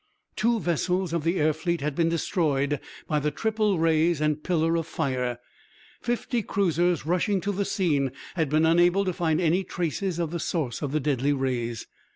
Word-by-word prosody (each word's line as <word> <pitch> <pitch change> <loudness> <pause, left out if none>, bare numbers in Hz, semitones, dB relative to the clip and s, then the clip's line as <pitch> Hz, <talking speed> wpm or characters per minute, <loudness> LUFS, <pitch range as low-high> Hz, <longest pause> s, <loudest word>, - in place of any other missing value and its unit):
Two 230 +1 +2
vessels 180 0 0
of 170 -3 0
the 170 +3 +1
air 155 0 +3
fleet 170 +2 -2
had 150 +1 -2
been 165 +2 +2
destroyed 150 -4 0 0.3
by 150 -2 0
the 150 +1 0
triple 215 +4 0
rays 165 0 +2
and 150 0 0
pillar 165 -2 +1
of 165 -1 -1
fire! 125 -5 -2 0.6
Fifty 240 0 -1
cruisers 175 -4 +1
rushing 185 +4 +1
to 205 - -1
the 200 0 -1
scene 145 -10 +1 0.2
had 160 -5 0
been 155 +2 +3
unable 175 +4 +4
to 185 - 0
find 165 -3 0
any 180 +2 +2
traces 175 +1 -2
of 170 -2 -2
the 170 - -3
source 150 -8 -2
of 145 -3 -2
the 155 - +1
deadly 140 0 +1
rays. 120 -4 -2
165 Hz, 185 wpm, -26 LUFS, 150-180 Hz, 0.6 s, unable